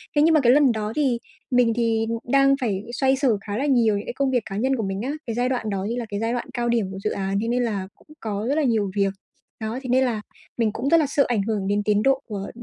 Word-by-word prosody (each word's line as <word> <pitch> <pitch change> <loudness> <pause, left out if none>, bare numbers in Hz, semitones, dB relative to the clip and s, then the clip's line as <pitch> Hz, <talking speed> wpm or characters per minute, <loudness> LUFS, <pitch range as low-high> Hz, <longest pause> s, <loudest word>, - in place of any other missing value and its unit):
Thế 290 - +4
nhưng 320 +2 +5
mà 310 - +5
cái 240 -2 +5
lần 280 -1 +5
đó 215 -1 -3
thì 270 -6 +1 0.3
mình 245 -2 +4
thì 225 -1 +1 0.2
đang 275 +2 +4
phải 205 -5 -1
xoay 265 +1 +2
sở 260 -6 +2
khá 205 0 -4
là 270 - -1
nhiều 235 -7 +3
những 200 - -5
cái - - -5
công 270 0 0
việc 245 -4 +1
cá 195 - -5
nhân 265 +5 +1
của 225 - -2
mình 195 0 -3
á, 260 +5 -2 0.2
cái 230 - -2
giai 245 +1 +1
đoạn 245 -4 -2
đó 195 -2 -2
như 235 - -2
là 245 -2 -3
cái 205 - -3
giai 225 +2 -1
đoạn 245 - -3
cao 240 -2 -1
điểm 225 -5 0
của 190 - -6
dự 215 - +1
án, 195 0 -2
thế 230 - -2
nên 245 +1 +1
là 200 -5 -2
cũng - - -26
có 210 -1 -3
rất 280 - +1
là 315 - +1
nhiều 220 -7 +1
việc, 195 -1 +1 0.5
đó, 220 +3 -3
thế 255 - -6
nên 260 +2 +4
là 225 -4 -1 0.4
mình 225 -3 +1
cũng 275 - -2
rất 335 - +6
là 305 - +2
sợ 280 0 +2
ảnh 235 -4 +1
hưởng 205 -2 -2
đến 205 +1 +1
tiến 210 0 +2
độ 270 0 +3
của 200 -3 -5
230 Hz, 300 wpm, -23 LUFS, 210-260 Hz, 0.5 s, rất